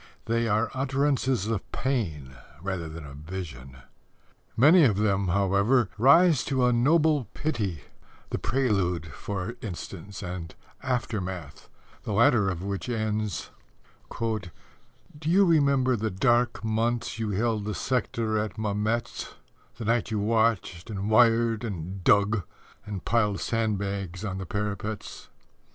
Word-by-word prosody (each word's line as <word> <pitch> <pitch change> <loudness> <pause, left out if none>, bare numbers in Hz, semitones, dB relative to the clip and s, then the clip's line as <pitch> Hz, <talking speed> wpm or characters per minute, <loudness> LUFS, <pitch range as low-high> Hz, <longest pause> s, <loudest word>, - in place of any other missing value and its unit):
They 115 0 +1
are 110 +1 +1
utterances 135 -3 +1
of 110 -3 -3
pain 80 - -2 0.2
rather 90 -2 -4
than 80 -1 -8
of 70 -1 -10
vision. 75 -6 -8 0.8
Many 155 +8 +7
of 110 -8 +4
them, 100 -2 +1
however, 100 +5 +2
rise 150 +5 +5
to 130 -2 +1
a 125 - +3
noble 150 +2 +3
pity 105 - -2 0.5
The - - -1
Prelude, 95 - 0
for 100 - -5
instance, 100 0 -7
and 90 -3 -6 0.3
Aftermath, 95 - -4 0.3
the 105 - -4
latter 105 -1 +4
of 90 -1 -4
which 100 +4 -4
ends: 110 -6 -2 0.6
Do 115 -1 -2 0.9
you 185 +5 +5
remember 140 -6 +3
the 110 0 -1
dark 120 +6 +1
months 115 0 -1
you 110 -1 -1
held 105 +1 0
the 105 -1 -3
sector 115 -3 -1
at 105 0 -3
Mametz, 110 +2 -2 0.4
The 115 - -6
night 115 +1 +1
you 110 - -1
watched 110 -4 0
and 100 0 -3
wired 115 0 +4
and 95 -3 -5
dug 105 +2 +4 0.5
and 100 -3 -6
piled 105 -4 +1
sandbags 100 -4 -2
on 95 -2 -3
parapets? 105 +1 -4
110 Hz, 125 wpm, -27 LUFS, 95-120 Hz, 0.9 s, Many